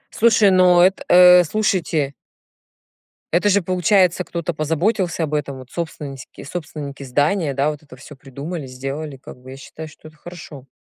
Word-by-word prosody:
Слушай, 215 -3 +4
ну 180 -1 +5
эт 190 +1 +2
э, 180 0 +7
слушайте. 170 -7 -1 1.2
Это 180 +4 +2
же 200 -1 +2
получается, 185 0 +2
кто-то 170 -1 -5
позаботился 170 +4 -1
об 150 -1 -4
этом, 140 -2 -3
вот 130 -1 -13
собственныськи 150 -5 -7
собственники 150 -3 -7
здания, 145 +3 0
да, 140 +3 +1
вот 150 - -10
это 140 -4 -15
всё 145 +3 -13
придумали, 140 +3 -8
сделали, 135 +3 -6
как 130 - -13
бы 130 - -14
я 135 - -9
считаю, 155 +3 -10
что 155 0 -15
это 155 - -24
хорошо. 155 -6 -11
155 Hz, 160 wpm, -20 LUFS, 140-180 Hz, 1.2 s, э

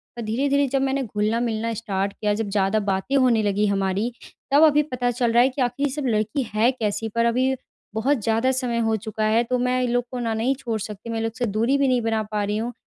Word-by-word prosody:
पर 240 - -6
धीरे-धीरे 280 +5 +1
जब 270 +1 0
मैंने 270 0 0
घुलना-मिलना 225 +1 -1
स्टार्ट 200 -3 -2
किया 210 -1 -1
जब 210 0 -2
ज़्यादा 200 +1 +1
बातें 200 +5 -1
होने 250 -5 +3
लगी 205 0 +1
हमारी, 200 +3 0 0.4
तब 290 +3 +6
अभी 300 -1 +5
पता 250 -4 -1
चल 240 -1 0
रहा 240 +1 +6
है 260 - +3
कि 265 +1 -4
आख़िर 250 +3 0
ये - - +1
सब 290 +1 -4
लड़की 220 +4 0
है 220 +4 +3
कैसी। 225 -3 -2
पर 230 0 +2
अभी 255 +3 +2 0.4
बहुत 240 +1 +1
ज़्यादा 225 +4 +2
समय 250 -2 -1
हो 220 - +2
चुका 220 0 -3
है 220 +2 +3
तो 250 +1 -1
मैं 250 +1 +1
इन 245 - 0
लोग 245 0 +1
को 250 - -4
ना 230 -2 -1
नहीं 235 +5 0
छोड़ 230 -4 -3
सकती 210 +2 -7
मैं 230 - -2
इन 225 - -2
लोग 225 0 -2
से 245 - 0
दूरी 230 +6 +1
भी 280 -1 +2
नहीं 250 -2 +2
बना 225 -1 0
पा 210 -1 0
रही 205 +1 -1
हूँ। 235 +3 -3
230 Hz, 250 wpm, -23 LUFS, 215-255 Hz, 0.4 s, तब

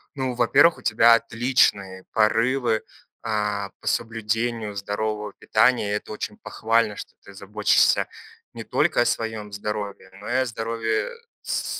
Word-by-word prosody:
Ну, 130 -2 -2
во-первых, 125 +7 +4
у - - -14
тебя 115 +2 +5
отличные 115 -5 +1
порывы, 115 +1 +2 0.4
а, 105 -2 -2
по - - -11
соблюдению 115 -1 -2
здорового 105 +1 -3
питания, 110 -1 +2
и 105 - 0
это 105 - -6
очень 210 - -5
похвально, 115 - 0
что - - -9
ты 100 - -14
заботишься 105 +2 +2 0.5
не - - -7
только - - +1
о - - +3
своем 110 -2 -2
здоровье, 100 -2 -5
но 105 - -10
и 120 - -1
о 130 0 +2
здоровье 115 - -2 0.3
с - - -2
110 Hz, 140 wpm, -24 LUFS, 105-115 Hz, 0.5 s, тебя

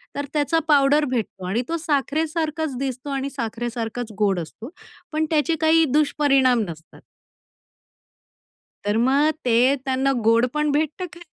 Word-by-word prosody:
तर 285 - -3
त्याचा 300 +2 +1
पावडर 290 0 +4
भेटतो 220 -6 -3
आणि 200 +7 0
तो 335 - -1
साखरेसारखाच 310 0 -1
दिसतो 265 +1 -4
आणि 275 0 -2
साखरेसारखाच 235 -1 -4
गोड 200 -3 +2
असतो, 195 - -8 0.4
पण 310 +1 0
त्याचे 315 +1 +2
काही 320 +1 +4
दुष्परिणाम 275 -5 +3
नसतात. 160 0 -12 1.8
तर 205 +1 +1
मग 270 +6 +3 0.2
ते 235 -2 +3 0.3
त्यांना 265 +1 +1
गोड 230 +2 +4
पण 300 -1 0
भेटतं 310 +5 -1
खायला 345 0 -12
275 Hz, 130 wpm, -22 LUFS, 235-305 Hz, 1.8 s, पावडर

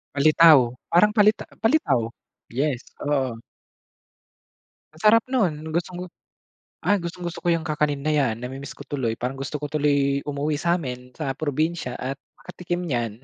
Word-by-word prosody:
Palitaw, 155 +1 +7 0.3
parang 180 +5 +5
palita- 210 0 +4 0.2
palitaw. 225 - +3 0.5
Yes, 135 +1 -1 0.2
oo. 135 -5 0 1.6
Ang 155 - -15
sarap 225 +1 +6
nun, 230 -11 +1 0.2
gustong-gu 180 +1 -3 0.8
ay, 205 0 +3
gustong-gusto 170 0 -5
ko - - -5
'yang 165 -1 +2
kakanin 150 -3 -1
na 155 - +1
'yan. 135 -7 +2
Nami-miss 135 +2 -7
ko - - -10
tuloy, 130 -6 -2
parang 125 +3 -4
gusto 135 +2 -5
ko 145 0 -4
tuloy 140 -2 +2
umuwi 145 +1 -1
sa'min 125 -8 -2
sa 135 - -2
probinsya 155 -1 -2
at 135 +2 -4 0.2
makatikim 175 0 -5
niyan. 120 -7 -3
150 Hz, 140 wpm, -24 LUFS, 135-170 Hz, 1.6 s, Palitaw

